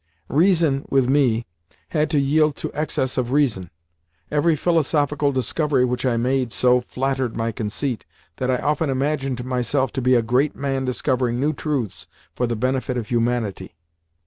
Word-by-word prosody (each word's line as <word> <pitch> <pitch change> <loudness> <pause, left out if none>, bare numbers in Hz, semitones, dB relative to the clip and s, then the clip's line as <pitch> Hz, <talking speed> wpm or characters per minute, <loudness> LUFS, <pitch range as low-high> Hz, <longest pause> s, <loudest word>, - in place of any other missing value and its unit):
Reason, 160 -2 +3
with 135 -2 +3
me, 125 -4 +2 0.4
had 155 -1 0
to 155 - +1
yield 150 +2 +2
to - - -5
excess 130 -4 -1
of 120 -1 -1
reason. 120 - +1 0.6
Every 155 +2 +3
philosophical 150 -3 +1
discovery 130 +1 +1
which 125 +1 -1
I 120 -2 +1
made 125 0 0
so 125 +1 +3
flattered 130 -1 -2
my 115 0 -1
conceit 115 +1 -3 0.3
that 130 - -2
I 130 - +2
often 150 +3 0
imagined 135 -2 -1
myself 130 +1 0
to 135 - -2
be 125 +1 +4
a 120 - +3
great 125 +6 +1
man 135 -1 -2
discovering 125 -1 0
new 150 +3 +1
truths 125 - -3 0.3
for 125 - -1
the 115 - -1
benefit 130 +2 -1
of 115 -3 -4
humanity. 115 -7 -1
130 Hz, 160 wpm, -22 LUFS, 120-145 Hz, 0.6 s, be